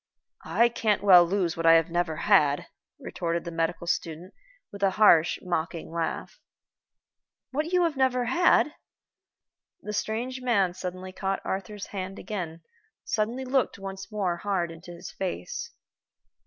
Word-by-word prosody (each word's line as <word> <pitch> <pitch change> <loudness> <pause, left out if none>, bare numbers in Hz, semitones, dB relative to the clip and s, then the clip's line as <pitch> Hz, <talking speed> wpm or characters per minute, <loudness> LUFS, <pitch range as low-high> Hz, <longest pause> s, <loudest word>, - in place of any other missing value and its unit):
"I 235 - +4
can't 215 -4 0
well 185 -3 +8
lose 175 -1 0
what 165 0 0
I 165 - +9
have 165 +1 +3
never 175 -2 0
had," 150 -5 +3 0.3
retorted 170 0 -3
the 170 - -6
medical 165 +1 -2
student, 170 +2 -3 0.4
with 200 - -10
a 195 - +4
harsh 175 -6 +5
mocking 165 -2 -3
laugh. 170 - -4 1.1
"What 300 +4 -1
you 360 -1 +3
have 330 -3 0
never 255 -2 +2
had!" 300 +3 +3 1.1
The 210 - -5
strange 240 +5 -3
man 200 -8 +2
suddenly 185 0 -6
caught 195 +1 -3
Arthur's 195 +2 -4
hand 190 -1 -6
again, 170 -6 -6 0.4
suddenly 230 +5 -2
looked 260 -4 0
once 195 0 -8
more 190 -5 -1
hard 175 -2 -1
in 165 0 -11
his 175 0 -9
face. 175 - -4
190 Hz, 140 wpm, -27 LUFS, 170-215 Hz, 1.1 s, I